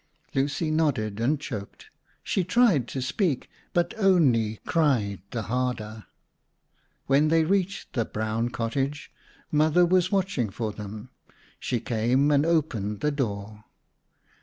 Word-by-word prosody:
Lucy 145 Hz, +3 st, 0 dB
nodded 120 Hz, -10 st, 0 dB
and 135 Hz, +6 st, +1 dB
choked. 105 Hz, -9 st, -8 dB, 0.3 s
She 190 Hz, -, 0 dB
tried 185 Hz, -, +3 dB
to 130 Hz, +1 st, -4 dB
speak 150 Hz, -, -1 dB, 0.2 s
but 175 Hz, 0 st, +1 dB
only 130 Hz, -, +3 dB
cried 120 Hz, -, +1 dB
the 115 Hz, -2 st, -3 dB
harder. 110 Hz, -2 st, -3 dB, 1.0 s
When 140 Hz, +3 st, +3 dB
they 165 Hz, +1 st, +4 dB
reached 195 Hz, +3 st, -1 dB
the 120 Hz, -, +1 dB
brown 110 Hz, +2 st, -2 dB
cottage, 135 Hz, +6 st, -3 dB, 0.4 s
Mother 155 Hz, +3 st, +4 dB
was 185 Hz, +1 st, +2 dB
watching 190 Hz, -, 0 dB
for 110 Hz, +2 st, -3 dB
them. 105 Hz, +3 st, -8 dB, 0.5 s
She 125 Hz, -, -1 dB
came 120 Hz, +5 st, +1 dB
and 145 Hz, +2 st, +3 dB
opened 115 Hz, -11 st, 0 dB
the 150 Hz, -, +1 dB
door. 105 Hz, -6 st, -4 dB
135 Hz, 125 wpm, -26 LUFS, 110-160 Hz, 1.0 s, they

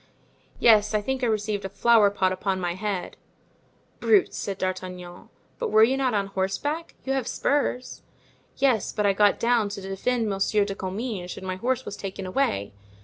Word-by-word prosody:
"Yes, 215 Hz, -2 st, +5 dB
I 210 Hz, -, +2 dB
think 265 Hz, +3 st, -2 dB
I 245 Hz, -, +1 dB
received 210 Hz, -2 st, -1 dB
a 195 Hz, -, -4 dB
flower 210 Hz, +1 st, +4 dB
pot 190 Hz, -2 st, +1 dB
upon 190 Hz, 0 st, -1 dB
my 175 Hz, -1 st, -1 dB
head." 190 Hz, -1 st, -4 dB, 0.8 s
"Brutes!" 405 Hz, -4 st, +3 dB
said 195 Hz, -2 st, -4 dB
D'Artagnan. 185 Hz, -1 st, -5 dB, 0.3 s
"But 475 Hz, -2 st, -1 dB
were 220 Hz, -, +6 dB
you 255 Hz, +4 st, +4 dB
not 260 Hz, -4 st, 0 dB
on 200 Hz, -1 st, +1 dB
horseback? 195 Hz, -, -3 dB
you 270 Hz, -, 0 dB
have 265 Hz, -3 st, -1 dB
spurs." 255 Hz, -3 st, -1 dB, 0.6 s
"Yes, 255 Hz, -7 st, +2 dB
but 210 Hz, -, -1 dB
I 200 Hz, -, +4 dB
got 205 Hz, +1 st, +3 dB
down 230 Hz, -3 st, +2 dB
to 200 Hz, -, -6 dB
defend 220 Hz, +5 st, -1 dB
Monsieur 200 Hz, +1 st, +1 dB
de 200 Hz, -, -3 dB
Comminges 195 Hz, -1 st, -5 dB
and 190 Hz, -, -8 dB
my 185 Hz, 0 st, -3 dB
horse 255 Hz, +5 st, -1 dB
was 205 Hz, -, -6 dB
taken 195 Hz, -1 st, -6 dB
away. 185 Hz, -, -1 dB
205 Hz, 180 wpm, -25 LUFS, 190-240 Hz, 0.8 s, were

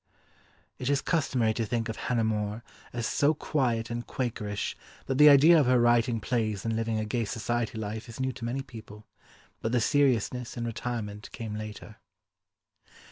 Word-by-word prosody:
It 125 Hz, -, -2 dB
is 140 Hz, -1 st, +3 dB
customary 130 Hz, -9 st, +1 dB
to 115 Hz, -, -1 dB
think 115 Hz, +1 st, -1 dB
of 110 Hz, -, -4 dB
Hannah 120 Hz, -2 st, -1 dB
More 105 Hz, 0 st, -1 dB, 0.3 s
as 120 Hz, -2 st, -3 dB
so 145 Hz, +6 st, +2 dB
quiet 120 Hz, -6 st, -1 dB
and 120 Hz, 0 st, -4 dB
Quakerish 105 Hz, -5 st, -3 dB, 0.3 s
that 135 Hz, 0 st, -1 dB
the 150 Hz, 0 st, +10 dB
idea 155 Hz, +4 st, +8 dB
of 140 Hz, -, +3 dB
her 125 Hz, -1 st, +4 dB
writing 120 Hz, 0 st, +3 dB
plays 110 Hz, -2 st, -1 dB
and 115 Hz, 0 st, 0 dB
living 115 Hz, 0 st, -1 dB
a 110 Hz, -, -1 dB
gay 115 Hz, +2 st, -1 dB
society 115 Hz, +1 st, -2 dB
life 110 Hz, +2 st, -5 dB
is 115 Hz, -, -9 dB
new 130 Hz, 0 st, 0 dB
to 120 Hz, -2 st, -7 dB
many 130 Hz, +3 st, -2 dB
people, 110 Hz, -4 st, -12 dB, 0.6 s
but 110 Hz, -, -1 dB
the 125 Hz, -, +4 dB
seriousness 125 Hz, -2 st, +1 dB
and 120 Hz, -, -2 dB
retirement 115 Hz, -3 st, -5 dB
came 110 Hz, -2 st, -6 dB
later. 110 Hz, 0 st, -8 dB
115 Hz, 175 wpm, -28 LUFS, 110-125 Hz, 0.6 s, the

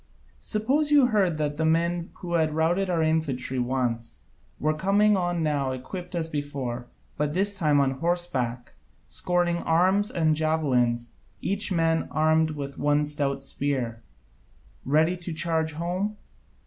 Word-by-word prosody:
Suppose 270 Hz, +8 st, +1 dB
you 290 Hz, -3 st, +6 dB
heard 190 Hz, -7 st, +2 dB
that 150 Hz, -1 st, -2 dB
the 160 Hz, -, 0 dB
very 160 Hz, -, +4 dB
men 170 Hz, +1 st, -1 dB
who 175 Hz, -1 st, -4 dB
had 160 Hz, -2 st, +1 dB
routed 175 Hz, +4 st, +1 dB
our 170 Hz, -3 st, +1 dB
infantry 145 Hz, -5 st, 0 dB
once 120 Hz, -, -2 dB, 0.4 s
were 155 Hz, +1 st, +1 dB
coming 200 Hz, +6 st, +3 dB
on 175 Hz, -3 st, 0 dB
now 140 Hz, -4 st, 0 dB
equipt 180 Hz, +8 st, -7 dB
as 165 Hz, -2 st, 0 dB
before, 140 Hz, -5 st, -4 dB, 0.3 s
but 150 Hz, +1 st, -1 dB
this 200 Hz, +2 st, +1 dB
time 150 Hz, -6 st, +2 dB
on 135 Hz, -1 st, +3 dB
horseback, 135 Hz, -9 st, -2 dB, 0.3 s
scorning 175 Hz, -1 st, 0 dB
arms 185 Hz, +6 st, +2 dB
and 160 Hz, -3 st, +1 dB
javelins, 130 Hz, -7 st, +1 dB, 0.3 s
each 200 Hz, +1 st, -1 dB
man 165 Hz, -2 st, +1 dB
armed 155 Hz, 0 st, +2 dB
with 140 Hz, -2 st, -6 dB
one 145 Hz, 0 st, +2 dB
stout 140 Hz, -2 st, -2 dB
spear, 130 Hz, -4 st, -2 dB, 0.8 s
ready 155 Hz, +6 st, +3 dB
to 175 Hz, -1 st, -6 dB
charge 160 Hz, -1 st, 0 dB
home? 180 Hz, +6 st, -2 dB
160 Hz, 145 wpm, -26 LUFS, 140-175 Hz, 0.8 s, you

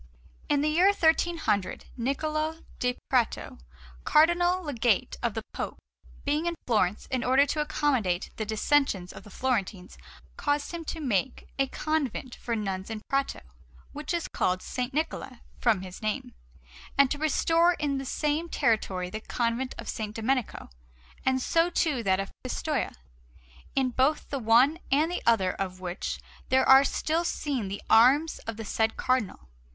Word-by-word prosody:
In 290 Hz, -1 st, +3 dB
the 300 Hz, -, +2 dB
year 345 Hz, +5 st, +4 dB
1300, 320 Hz, -, +1 dB
Niccola 310 Hz, +5 st, -2 dB, 0.2 s
da 250 Hz, 0 st, 0 dB
Prato, 245 Hz, -, 0 dB, 0.4 s
Cardinal 350 Hz, +4 st, +4 dB
Legate 245 Hz, -, +1 dB
of 235 Hz, -3 st, -1 dB
the 220 Hz, -, -3 dB
Pope, -, -, -4 dB, 0.5 s
being 300 Hz, +4 st, 0 dB
in 340 Hz, -, -1 dB
Florence 210 Hz, -4 st, +1 dB
in 255 Hz, -2 st, 0 dB
order 265 Hz, +3 st, +4 dB
to 300 Hz, +1 st, -1 dB
accommodate 245 Hz, -12 st, 0 dB
the 220 Hz, -, -1 dB
dissensions 215 Hz, -3 st, +1 dB
of -, -, -10 dB
the 210 Hz, -, -13 dB
Florentines, 200 Hz, -6 st, -2 dB, 0.4 s
caused 290 Hz, 0 st, 0 dB
him 340 Hz, -1 st, -5 dB
to 325 Hz, -, -4 dB
make 255 Hz, -3 st, -1 dB
a 270 Hz, -, +3 dB
convent 275 Hz, -4 st, -2 dB
for 235 Hz, -, -3 dB
nuns 195 Hz, -2 st, -3 dB
in 220 Hz, -1 st, -5 dB
Prato, 275 Hz, 0 st, 0 dB, 0.5 s
which 300 Hz, +1 st, -5 dB
is 340 Hz, -1 st, -1 dB
called 185 Hz, 0 st, 0 dB
S. -, -, -9 dB, 0.2 s
Niccola 275 Hz, -4 st, -3 dB, 0.2 s
from 225 Hz, -6 st, +2 dB
his 185 Hz, -1 st, -9 dB
name, 215 Hz, -1 st, -3 dB, 0.6 s
and 275 Hz, -2 st, +5 dB
to 290 Hz, -, -1 dB
restore 330 Hz, +3 st, +3 dB
in 285 Hz, -4 st, -1 dB
the -, -, -4 dB
same 300 Hz, +5 st, -1 dB
territory 185 Hz, -, 0 dB
the 215 Hz, -, -5 dB
Convent 240 Hz, +3 st, -2 dB
of -, -, -7 dB
S. -, -, -4 dB
Domenico, 235 Hz, -, -2 dB, 0.5 s
and 260 Hz, 0 st, +2 dB
so 330 Hz, +6 st, +2 dB
too 310 Hz, -7 st, +1 dB
that 190 Hz, -3 st, +2 dB
of 195 Hz, -, -4 dB
Pistoia; -, -, -2 dB, 0.8 s
in 265 Hz, -2 st, +2 dB
both 270 Hz, +5 st, +1 dB
the 280 Hz, -, -1 dB
one 250 Hz, +7 st, +4 dB
and 305 Hz, +5 st, +3 dB
the 355 Hz, -, -2 dB
other 195 Hz, -6 st, +4 dB
of 185 Hz, -1 st, -4 dB
which 180 Hz, +1 st, -4 dB, 0.3 s
there 260 Hz, +1 st, +3 dB
are 265 Hz, +1 st, +9 dB
still 320 Hz, +4 st, 0 dB
seen 275 Hz, -, -2 dB
the 200 Hz, +1 st, -6 dB
arms 270 Hz, +8 st, +5 dB
of 225 Hz, -1 st, -4 dB
the 225 Hz, -, -6 dB
said 220 Hz, +2 st, 0 dB
Cardinal. 240 Hz, -, -1 dB
260 Hz, 160 wpm, -28 LUFS, 220-300 Hz, 0.8 s, are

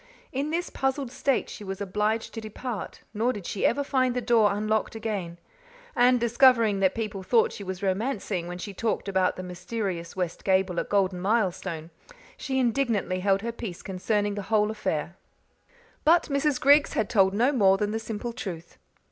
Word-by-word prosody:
In 275 Hz, +3 st, -2 dB
this 340 Hz, +3 st, -2 dB
puzzled 270 Hz, -1 st, -1 dB
state 275 Hz, 0 st, 0 dB
she -, -, -9 dB
was 195 Hz, -1 st, -5 dB
obliged 210 Hz, +3 st, -1 dB
to 225 Hz, -, -5 dB
depart, 220 Hz, 0 st, -6 dB
nor 230 Hz, +4 st, +1 dB
did 205 Hz, -7 st, -7 dB
she 195 Hz, -, +1 dB
ever 285 Hz, -, 0 dB
find 255 Hz, -3 st, +1 dB
the -, -, +1 dB
door 230 Hz, -3 st, +3 dB
unlocked 215 Hz, +2 st, -1 dB
again; 205 Hz, -6 st, -4 dB, 0.6 s
and, 250 Hz, +1 st, +5 dB
discovering 230 Hz, -3 st, +4 dB
that 190 Hz, -1 st, +2 dB
people 215 Hz, -3 st, -3 dB
thought 225 Hz, +4 st, +3 dB
she 205 Hz, -, -8 dB
was 190 Hz, 0 st, -6 dB
romancing 195 Hz, -3 st, -1 dB
when 175 Hz, 0 st, -5 dB
she 195 Hz, +3 st, -6 dB
talked 220 Hz, +1 st, -2 dB
about 190 Hz, -2 st, +1 dB
the 185 Hz, -, -6 dB
mysterious 180 Hz, -1 st, -4 dB
west 180 Hz, -3 st, -3 dB
gable 190 Hz, -2 st, +2 dB
at -, -, -4 dB
Golden 190 Hz, -3 st, +1 dB
Milestone, 185 Hz, -5 st, -1 dB, 0.4 s
she 265 Hz, -2 st, -3 dB
indignantly 235 Hz, -7 st, +1 dB
held 195 Hz, +1 st, +1 dB
her 235 Hz, -, -2 dB
peace 225 Hz, -6 st, -7 dB
concerning 205 Hz, +2 st, -1 dB
the 205 Hz, -, -4 dB
whole 215 Hz, -1 st, +3 dB
affair. 175 Hz, -5 st, -3 dB, 0.9 s
But 335 Hz, +2 st, +4 dB
Mrs. 280 Hz, -1 st, +1 dB
Griggs 285 Hz, +2 st, +5 dB
had 215 Hz, -, 0 dB
told 195 Hz, -3 st, +3 dB
no 245 Hz, +6 st, +3 dB
more 195 Hz, -8 st, +4 dB
than 210 Hz, +1 st, -1 dB
the 220 Hz, -, -1 dB
simple 225 Hz, +2 st, -5 dB
truth. 175 Hz, -7 st, -7 dB
210 Hz, 180 wpm, -26 LUFS, 190-240 Hz, 0.9 s, and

